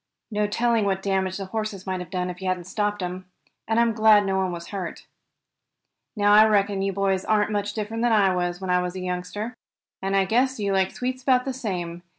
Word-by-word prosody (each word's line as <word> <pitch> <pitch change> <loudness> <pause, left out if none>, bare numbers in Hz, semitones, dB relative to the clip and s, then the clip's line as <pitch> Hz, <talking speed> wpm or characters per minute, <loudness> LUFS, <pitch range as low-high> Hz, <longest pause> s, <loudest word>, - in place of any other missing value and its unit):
No 210 0 +1
telling 230 0 +1
what 195 -1 -1
damage 190 -1 0
the 195 - -5
horses 215 -1 -4
might 185 -1 -2
have 180 - -7
done 180 -1 -2
if 180 +1 -12
you 190 - -3
hadn't 185 -1 -1
stopped 205 +2 -2
'em. 180 +1 -5 0.4
And 225 +1 +2
I'm 235 -1 +3
glad 215 -2 +5
no 195 0 0
one 190 -1 0
was 170 -1 -7
hurt. 190 -4 -6 1.1
"Now 205 -1 +4
I 215 +1 +9
reckon 200 -2 +2
you 195 0 0
boys 195 -1 0
aren't 215 -1 +1
much 205 -1 -1
different 225 +1 -3
than 240 0 +2
I 200 -4 +4
was, 175 0 -1
when 190 -1 -3
I 180 0 +3
was 180 0 -4
a - - -4
youngster, 185 +5 -4 0.5
and 195 +1 -1
I 195 -1 +3
guess 250 +5 +1
you 200 -1 0
like 190 -1 +2
sweets 255 +1 -4
about 255 -1 +3
the 265 - -2
same. 180 -8 -4
195 Hz, 225 wpm, -24 LUFS, 185-215 Hz, 1.1 s, I